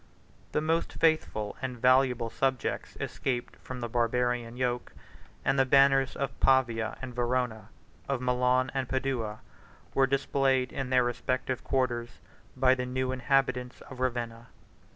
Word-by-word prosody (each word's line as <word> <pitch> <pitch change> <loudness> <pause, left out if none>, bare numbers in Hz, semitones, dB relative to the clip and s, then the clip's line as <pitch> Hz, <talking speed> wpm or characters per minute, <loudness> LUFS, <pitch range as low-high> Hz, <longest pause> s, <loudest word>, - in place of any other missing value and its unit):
The - - +1
most 165 +2 0
faithful 155 -10 +1
and 130 -2 -4
valuable 125 -2 +3
subjects 130 -3 -1
escaped 125 -2 -3
from 130 -1 -8
the 120 - -2
Barbarian 120 0 0
yoke; 125 -1 -2 0.5
and 135 +1 +2
the - - +6
banners 135 0 +4
of 135 -1 -4
Pavia 120 -4 +2
and 125 -1 -5
Verona, 120 -2 -1 0.4
of 140 -2 0
Milan 125 +1 +2
and 135 -2 -2
Padua, 130 -5 -2 0.5
were 135 -1 +4
displayed 135 -1 +1
in 135 -2 -3
their 130 -1 +4
respective 130 +1 -2
quarters 120 -3 -1 0.4
by 130 0 +5
the 125 -1 -2
new 130 0 -1
inhabitants 130 -1 0
of 130 - -11
Ravenna. 120 -2 -2
125 Hz, 135 wpm, -29 LUFS, 120-135 Hz, 0.5 s, the